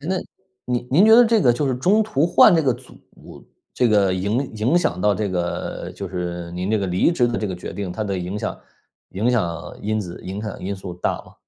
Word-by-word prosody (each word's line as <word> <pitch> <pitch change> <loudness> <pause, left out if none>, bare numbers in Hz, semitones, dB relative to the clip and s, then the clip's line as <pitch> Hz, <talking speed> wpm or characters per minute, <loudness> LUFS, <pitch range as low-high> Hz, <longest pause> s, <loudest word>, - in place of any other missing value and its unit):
诶， 150 - -7
那， 190 - +1 0.5
您 125 -1 -2
您 165 +10 +5
觉 220 +1 +7
得 245 +1 +8
这 225 -1 +3
个 125 -4 +4
就 130 +5 -1
是 130 - 0
中 195 +12 +3
途 160 -8 +1
换 175 +2 +6
这 160 - +3
个 130 - +2
组， 130 +2 -15 0.7
这 125 - +2
个 100 -3 +3
影 105 +9 -1
影 120 +11 +2
响 175 - -1
到 105 +1 +3
这 105 +1 -2
个 90 -2 -3
就 100 - -6
是 85 -1 -5
您 90 +3 -3
这 110 - +2
个 100 - -2
离 90 - +2
职 125 -7 +2
的 120 - -2
这 105 - -2
个 95 - -4
决 90 - -7
定， 100 -3 -5
它 110 +4 -3
的 100 -2 -2
影 90 +3 -4
响 - - -4 0.5
影 110 +6 0
响 85 -9 -2
因 110 +1 -1
子 90 -4 -8
影 95 +3 -6
响 105 -2 -6
因 100 +2 -3
素 95 -2 -8
大 90 - -1
吗？ - - -18
105 Hz, 260 characters per minute, -21 LUFS, 95-130 Hz, 0.7 s, 得